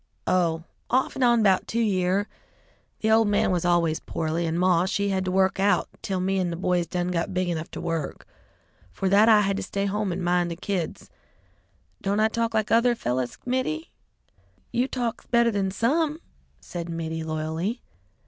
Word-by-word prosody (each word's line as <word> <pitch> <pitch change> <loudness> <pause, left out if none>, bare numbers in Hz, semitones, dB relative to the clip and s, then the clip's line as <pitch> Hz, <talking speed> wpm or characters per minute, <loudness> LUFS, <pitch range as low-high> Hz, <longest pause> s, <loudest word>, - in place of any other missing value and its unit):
Oh, 165 -3 +1 0.3
off 260 +1 +1
and 265 - -1
on 235 -2 +4
'bout 190 -2 +3
two 230 - -1
year. 195 -2 +1 0.7
The 220 - +2
old 220 0 +5
man 205 -2 +2
was 180 -2 0
always 170 -2 +2
poorly, 165 +1 -2
and 165 +1 -1
Maw, 180 -1 +3
she 200 +1 0
had 190 -1 0
to 185 - -1
work 190 +1 +2
out, 205 +1 +2
till 190 -2 -2
me 190 +1 0
an' 180 -2 0
the 170 - -3
boys 180 -1 0
done 180 0 -2
got 180 +1 -2
big 185 -1 0
enough 160 -2 -3
to - - -7
work. 165 -4 -3 0.7
'Fore 190 - -1
that 205 +4 +6
I 215 -2 +7
had 195 -1 0
to - - -2
stay 200 0 -2
home 205 0 -1
and 180 +1 -3
mind 175 0 +1
the 170 - -4
kids. 180 -2 -4 0.9
Don't 200 +1 0
I 220 0 +4
talk 230 0 -1
like 220 -1 0
other 235 +1 +4
fellers, 125 - -2
Mittie?" 260 +6 -2 0.8
"You 245 +2 +1
talk 245 -3 -4
better 235 -1 +4
than 200 -2 0
some," 295 - 0 0.4
said 170 -1 -6
Mittie 160 -1 -3
loyally. 160 +8 -3
190 Hz, 185 wpm, -25 LUFS, 175-220 Hz, 0.9 s, I